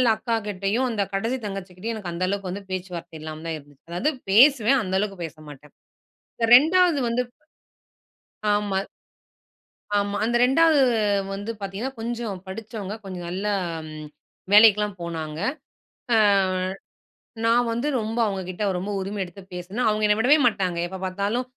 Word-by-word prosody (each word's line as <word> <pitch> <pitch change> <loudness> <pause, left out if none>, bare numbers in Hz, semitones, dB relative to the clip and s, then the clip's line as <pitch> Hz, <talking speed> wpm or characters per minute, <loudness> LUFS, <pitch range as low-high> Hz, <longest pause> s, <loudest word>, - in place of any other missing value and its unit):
அக்காகிட்டயும், 215 +1 -1
அந்த 220 -3 -1
கடைசி 225 +6 -1
தங்கச்சிகிட்டயும் 195 +2 -5
எனக்கு 190 -5 -5
அந்த 175 - -3
அளவுக்கு 195 -1 -2
வந்து 200 +2 -6
பேச்சுவார்த்தை 175 -3 -5
இல்லாம 155 0 -7
தான் 165 - -2
இருந்துச்சு. 145 -1 -18
அதாவது 180 - 0 0.2
பேசுவேன், 255 +3 +6
அந்த 190 -1 -2
அளவுக்கு 195 -3 -3
பேசமாட்டேன். 150 -2 -12 0.6
இந்த 230 - +1
2 340 +2 +4
வந்து, 235 +2 +1 1.3
ஆமா. 205 -2 0 1.2
ஆமா 200 0 0
அந்த 240 +1 +2
2 310 +3 +4 0.5
வந்து 205 +3 -4
பார்த்தீங்கன்னா, 200 +7 -4
கொஞ்சம் 230 -4 -4
படிச்சவங்க. 215 0 -6
கொஞ்சம் 180 -2 -6
நல்லா 200 +4 -1 0.4
ம் 155 0 -8 0.5
வேலைக்கெல்லாம் 210 -2 +6
போனாங்க. 160 -2 -5 0.8
அ - - +5 1.3
நான் 235 +1 +3
வந்து 235 +5 -1
ரொம்ப 220 +2 -3
அவங்ககிட்ட 190 0 -4
ரொம்ப 190 +3 -4
உரிமை 195 +2 -4
எடுத்து 185 +2 -11
பேசுனேன். 190 +8 -2
அவங்க 215 0 +2
என்ன 210 - +4
விடவே 265 +7 +5
மாட்டாங்க. 190 -6 0
எப்போ 190 +2 -7
பார்த்தாலும் 200 +6 -1
200 Hz, 135 wpm, -24 LUFS, 185-230 Hz, 1.3 s, பேசுவேன்